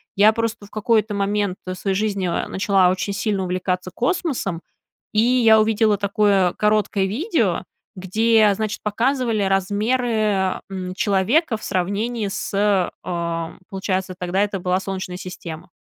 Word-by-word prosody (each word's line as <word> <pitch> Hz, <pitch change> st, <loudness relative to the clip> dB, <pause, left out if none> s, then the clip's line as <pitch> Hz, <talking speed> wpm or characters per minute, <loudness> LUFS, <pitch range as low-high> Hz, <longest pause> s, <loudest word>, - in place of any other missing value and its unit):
Я 210 Hz, +2 st, +6 dB
просто 230 Hz, -2 st, -3 dB
в -, -, -16 dB
какой-то 215 Hz, 0 st, +1 dB
момент 200 Hz, -1 st, 0 dB, 0.2 s
своей 190 Hz, +1 st, -2 dB
жизни, 200 Hz, -2 st, -1 dB
а, 170 Hz, -, -1 dB
начала 190 Hz, -2 st, +3 dB
очень 190 Hz, +2 st, -1 dB
сильно 205 Hz, -2 st, -1 dB
увлекаться 180 Hz, 0 st, -2 dB
космосом, 245 Hz, -, -1 dB, 0.5 s
и 215 Hz, -, +4 dB
я 230 Hz, -2 st, +5 dB
увидела 215 Hz, -1 st, +2 dB
такое 200 Hz, -2 st, +2 dB
короткое 210 Hz, -2 st, +1 dB
видео, 280 Hz, -, 0 dB, 0.3 s
где, 215 Hz, +3 st, +3 dB
значит, 215 Hz, 0 st, -3 dB
показывали 230 Hz, 0 st, 0 dB
размеры, 205 Hz, 0 st, +1 dB
м, 185 Hz, -1 st, -5 dB
человека 225 Hz, -, +2 dB
в -, -, -15 dB
сравнении 205 Hz, +4 st, -1 dB
с, 195 Hz, -1 st, 0 dB, 0.2 s
эм, 170 Hz, -1 st, -3 dB
получается, 190 Hz, -1 st, -2 dB
тогда 180 Hz, +2 st, 0 dB
это 200 Hz, -2 st, -2 dB
была 180 Hz, +1 st, 0 dB
Солнечная 190 Hz, -2 st, -5 dB
система. 180 Hz, -2 st, -8 dB
200 Hz, 135 wpm, -21 LUFS, 185-220 Hz, 0.5 s, Я